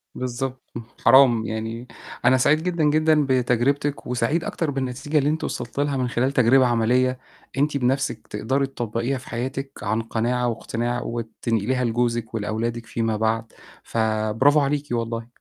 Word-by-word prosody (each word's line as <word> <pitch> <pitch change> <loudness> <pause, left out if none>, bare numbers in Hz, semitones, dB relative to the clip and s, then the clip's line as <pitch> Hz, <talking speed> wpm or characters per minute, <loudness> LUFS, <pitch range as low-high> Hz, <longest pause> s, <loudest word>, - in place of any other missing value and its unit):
بالضبط، 130 +1 -4 0.3
حرام، 120 -3 +6
يعني 115 +2 -4 0.4
أنا 130 +1 +6
سعيد 155 +5 +3
جدًا، 170 -3 0
جدًا 155 0 +3
بتجربتِك 130 +3 +1
وسعيد 125 +7 0
أكتر 160 -4 -2
بالنتيجة 135 +3 -2
اللي 145 +1 +3
أنتِ 160 +1 -1
وصلتِ 120 +3 -4
لها 145 -1 0
من 125 -1 0
خلال 125 +2 0
تجربة 130 0 +5
عملية، 125 +2 +2 0.4
أنتِ 145 0 +1
بنفسِك 130 -3 -1
تقدري 130 +6 -1
تطبّقيها 120 +1 -2
في 130 - -12
حياتِك 130 +3 -4
عن 110 +2 0
قناعة 120 +2 -1
واقتناع، 120 +1 -2
وتنقليها 115 +1 -2
لجوزِك 120 -1 -1
ولأولادِك 115 +2 -2
فيما 115 -1 -1
بعد، 110 +1 -1 0.3
فبرافو 110 +6 +2
عليكِ 145 +1 0
والله. 115 -1 -2
125 Hz, 140 wpm, -23 LUFS, 115-135 Hz, 0.4 s, حرام